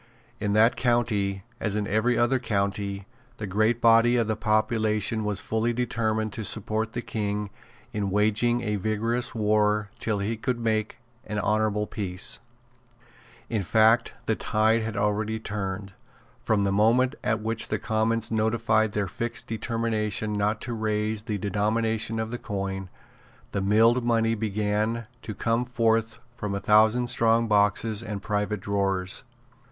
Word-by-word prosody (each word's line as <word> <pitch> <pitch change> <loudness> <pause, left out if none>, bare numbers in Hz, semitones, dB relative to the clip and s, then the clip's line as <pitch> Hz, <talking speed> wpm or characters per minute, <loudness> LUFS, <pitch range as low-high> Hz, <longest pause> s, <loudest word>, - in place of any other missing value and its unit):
In 105 -1 -1
that 110 +3 +5
county, 105 -6 0 0.2
as 105 -2 -1
in 105 -1 0
every 110 +4 +1
other 125 +2 +2
county, 100 -3 -2 0.3
the 110 - -4
great 110 +4 +1
body 115 +1 +5
of 115 - +2
the 110 0 -1
population 110 0 +1
was 105 -2 -1
fully 110 +2 0
determined 110 -3 -1
to 110 - -4
support 110 +2 -1
the 120 - -3
King 105 -1 -3 0.4
in 105 -2 -1
waging 110 +4 +2
a 105 -3 -1
vigorous 110 +5 -1
war 105 -1 +1
till 110 -2 -1
he 105 +3 -2
could 125 +1 -2
make 110 0 -1 0.3
an 105 - -3
honourable 105 0 +1
peace. 95 -4 -2 1.1
In 110 -3 -1
fact 110 +4 +3
the 110 - +1
tide 110 +2 +2
had 110 -2 -4
already 105 +2 0
turned. 100 -2 -4 0.5
From 105 -2 +1
the 100 - +1
moment 115 +6 +3
at 110 0 +1
which 115 0 -1
the - - -1
Commons 115 0 0
notified 110 -1 +1
their 105 -2 0
fixed 115 +6 -3
determination 110 -2 -2
not 105 +1 0
to 120 - -4
raise 110 -1 -1
the 110 -2 -3
denomination 110 +2 0
of 110 0 -3
the 120 - -4
coin, 95 -2 -4 0.6
the 100 - -1
milled 115 +5 +4
money 115 -1 +2
began 110 +1 -1 0.2
to 105 - -6
come 115 +4 0
forth 115 -2 +1 0.2
from 105 -5 -4
a - - -1
thousand 110 +4 +4
strong 115 -1 +2
boxes 105 +1 +2
and 105 -4 -5
private 105 -1 -1
drawers. 95 -2 -1
110 Hz, 150 wpm, -26 LUFS, 105-115 Hz, 1.1 s, that